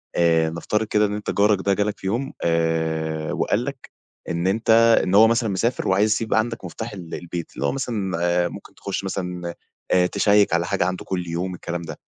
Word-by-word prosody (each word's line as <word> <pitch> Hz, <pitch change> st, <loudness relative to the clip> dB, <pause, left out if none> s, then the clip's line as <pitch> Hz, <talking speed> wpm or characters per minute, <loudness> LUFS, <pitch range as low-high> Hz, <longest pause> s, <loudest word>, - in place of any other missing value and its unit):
آآ 80 Hz, -2 st, +3 dB
نفترض 95 Hz, +6 st, -1 dB
كده 105 Hz, 0 st, +3 dB
إن 100 Hz, -, -4 dB
أنت 105 Hz, -, -3 dB
جارك 105 Hz, 0 st, +3 dB
ده 100 Hz, -, +3 dB
جالك 105 Hz, +1 st, -1 dB
في -, -, -5 dB
يوم 130 Hz, +8 st, -2 dB
آآ 80 Hz, -1 st, 0 dB
وقال -, -, 0 dB
لك -, -, -7 dB, 0.4 s
إن 85 Hz, +2 st, -1 dB
أنت 110 Hz, +4 st, -1 dB, 0.3 s
إن 95 Hz, +1 st, 0 dB
هو 110 Hz, +2 st, +8 dB
مثلًا 115 Hz, -1 st, +1 dB
مسافر 115 Hz, +6 st, -1 dB
وعايز 100 Hz, +3 st, +3 dB
يسيب 110 Hz, 0 st, 0 dB
عندك 115 Hz, -2 st, 0 dB
مُفتاح 110 Hz, +6 st, -6 dB
ال 90 Hz, -5 st, -7 dB
البيت، 85 Hz, -1 st, -6 dB
اللي -, -, -2 dB
هو -, -, +1 dB
مثلًا 110 Hz, -9 st, -2 dB
آآ 85 Hz, 0 st, +2 dB
ممكن -, -, -11 dB
تخش 100 Hz, 0 st, -4 dB
مثلًا 90 Hz, -3 st, -4 dB, 0.4 s
آآ 90 Hz, -1 st, +4 dB
تشيّك 100 Hz, -1 st, +3 dB
على 85 Hz, 0 st, +2 dB
حاجة 90 Hz, -, 0 dB
عنده 90 Hz, 0 st, -3 dB
كل 90 Hz, -2 st, -3 dB
يوم 90 Hz, +2 st, -3 dB
الكلام 85 Hz, 0 st, -5 dB
ده، 80 Hz, -3 st, -8 dB
95 Hz, 205 wpm, -23 LUFS, 85-105 Hz, 0.4 s, هو